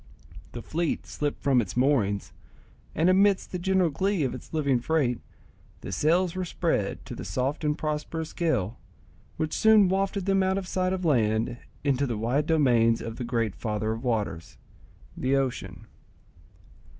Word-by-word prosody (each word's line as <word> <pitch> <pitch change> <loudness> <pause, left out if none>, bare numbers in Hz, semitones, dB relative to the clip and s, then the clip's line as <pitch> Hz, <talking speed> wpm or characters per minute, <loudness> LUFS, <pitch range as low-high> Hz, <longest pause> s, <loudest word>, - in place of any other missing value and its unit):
The 120 - -6
fleet 165 0 -2
slipped 145 -1 -4
from 135 -3 +4
its 100 +1 -6
moorings, 120 -7 +1 0.6
and, 165 - +2
amidst 195 +1 +3
the 180 - -3
general 185 -2 +2
glee 190 +3 0
of 130 - -1
its - - -10
living 140 -5 +1
freight, 130 -3 0 0.6
the - - -7
sails 170 - +2
were 185 - -2
spread 165 - -1
to - - -7
the - - -7
soft 135 +5 -2
and 150 0 0
prosperous 155 +1 -3
gale, 125 - -1 0.6
which 155 -1 -2
soon 215 -3 +5
wafted 195 0 0
them 195 -1 +3
out 190 0 +1
of 195 -2 -4
sight 185 0 0
of 185 -1 -2
land 115 -5 +1 0.3
into 140 -1 +1
the 115 -3 -2
wide 125 +7 0
domains 120 -8 +3
of 115 0 -6
the 125 - -4
great 115 -4 -1
father 110 -1 -2
of 115 +2 -4
waters, 105 -8 -2 0.6
the 130 +1 0
ocean. 135 -2 -2
145 Hz, 160 wpm, -27 LUFS, 120-175 Hz, 0.6 s, soon